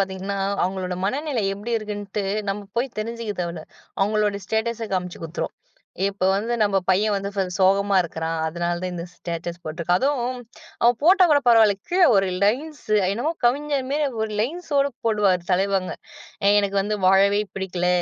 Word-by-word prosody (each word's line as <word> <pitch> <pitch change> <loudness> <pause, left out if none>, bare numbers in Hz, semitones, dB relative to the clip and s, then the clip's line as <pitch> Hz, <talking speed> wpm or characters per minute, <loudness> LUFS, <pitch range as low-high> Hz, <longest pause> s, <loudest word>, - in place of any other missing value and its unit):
பார்த்தீங்கன்னா, 195 +1 -2 0.3
அவங்களோட 185 -1 -3
மனநிலை 265 0 -1
எப்டி 215 +4 -6
இருக்குன்ட்டு 205 -1 -4 0.3
நம்ம 205 +1 -4 0.2
போய் 250 -1 -2
தெரிஞ்சுக்க 230 -1 -4
தேவல்ல. 170 -2 -5 0.4
அவங்களோட 205 0 +1
ஸ்டேட்டஸ் 230 +1 -1
காமிச்சு 180 -2 -4
குடுத்துரும். 165 +2 -4 0.5
இப்ப 200 -1 -2
வந்து 225 +5 -1
நம்ம 200 -2 +2
பையன் 205 +3 +3
வந்து 195 0 -2
வ 195 - +2
சோகமா 195 +1 +3
இருக்குறான். 165 -1 -4
அதனால 170 +2 -1
தான் 185 - -2
இந்த 170 0 -5
ஸ்டேட்டஸ் 170 0 -6
போட்டு 155 +2 -6
இருக்கான். 175 +2 +2
அதும் 280 0 +1 0.6
அவன் 235 0 +4
போட்டா 370 +4 +6
கூடப் 285 -3 +3
பரவால்ல. 225 -3 +6
கீழ 360 +1 +2
ஒரு 195 0 +3 0.2
லைன்ஸு 270 +1 -1 0.2
என்னமோ 240 +10 -1
கவிஞர் 280 +2 +1
மாரி 295 +1 +1 0.2
ஒரு 220 - -2
லைன்ஸு 320 +9 -3
ஓட 275 - +3 0.2
போடுவாரு 205 -5 +2
தலைவங்க. 190 0 +1 0.7
எனக்கு 200 -1 0
வந்து 210 +2 -1
வாழவே 200 +2 +5
பிடிக்கல. 180 -2 -2
200 Hz, 155 wpm, -23 LUFS, 185-235 Hz, 0.7 s, போட்டா